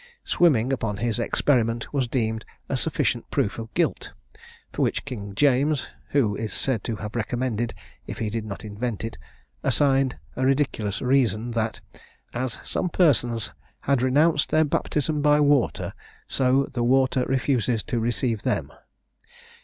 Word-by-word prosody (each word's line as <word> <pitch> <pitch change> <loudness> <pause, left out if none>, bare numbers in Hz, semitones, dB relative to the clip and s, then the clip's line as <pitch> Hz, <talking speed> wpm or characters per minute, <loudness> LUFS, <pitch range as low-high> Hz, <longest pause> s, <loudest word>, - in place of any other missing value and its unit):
Swimming, 135 -7 +3
upon 115 -5 -1
this 115 +1 -1
experiment, 115 -4 +1
was 135 -3 +1
deemed 110 -3 -1 0.2
a - - -1
sufficient - - -1
proof 105 - 0
of 115 -1 -7
guilt; - - 0 0.6
for - - -2
which - - 0
king 100 -7 -6
James 140 +2 +2 0.2
(who 115 -8 +2
is 110 +1 -4
said 125 -7 0
to 115 - -2
have 105 +1 -7
recommended, 120 0 -1 0.3
if - - -6
he 110 -2 -2
did 115 0 -2
not 105 0 -7
invent 105 +1 -4
it) 115 0 -5 0.4
assigned 135 -2 +2 0.2
a 130 - -1
ridiculous 130 -7 0
reason, 120 -3 +2
that, 110 -1 -2 0.5
"as 125 0 -2
some 180 - -1
persons 120 - +2 0.3
had 140 -3 +1
renounced 145 +4 +3
their 155 0 +4
baptism 150 +1 0
by 150 0 +4
water, 145 -3 +2 0.3
so 130 +1 +2
the 120 - 0
water 130 +1 +3
refuses 125 -4 +1
to 125 -6 -2
receive 115 -1 0
them." - - -1
125 Hz, 145 wpm, -25 LUFS, 110-135 Hz, 0.6 s, their